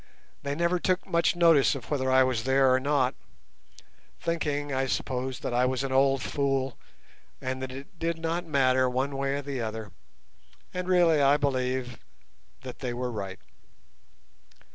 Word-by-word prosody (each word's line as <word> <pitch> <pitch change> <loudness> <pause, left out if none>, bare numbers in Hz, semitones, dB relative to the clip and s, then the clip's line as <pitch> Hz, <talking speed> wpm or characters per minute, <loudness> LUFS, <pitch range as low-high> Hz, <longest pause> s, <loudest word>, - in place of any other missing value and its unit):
They 140 0 -3
never 170 +2 +1
took 185 +2 0
much 170 +1 +1
notice 165 -6 +5
of 135 0 -9
whether 130 -3 0
I 130 0 +6
was 130 -3 0
there 135 0 +4
or 130 - +3
not, 135 -2 +1 1.1
thinking, 145 -4 -2
I 135 0 0
suppose, 130 0 -3
that - - -3
I 125 +1 +3
was 130 +1 -1
an 135 - -3
old 135 0 +3
fool, 135 -3 -1 0.6
and 130 0 -4
that 130 0 -4
it 140 +7 -11
did 165 0 -1
not 165 +2 -2
matter 130 -3 +3
one 130 +3 -1
way 135 0 -1
or 145 - -4
the 135 -3 -4
other, 110 -2 -5 0.8
and 180 0 -3
really 175 -4 +4
I 140 +1 +5
believe 130 -3 -1 0.6
that 130 -2 -9
they 125 -3 -3
were 125 0 -3
right. 100 -4 -5
135 Hz, 165 wpm, -27 LUFS, 130-145 Hz, 1.1 s, I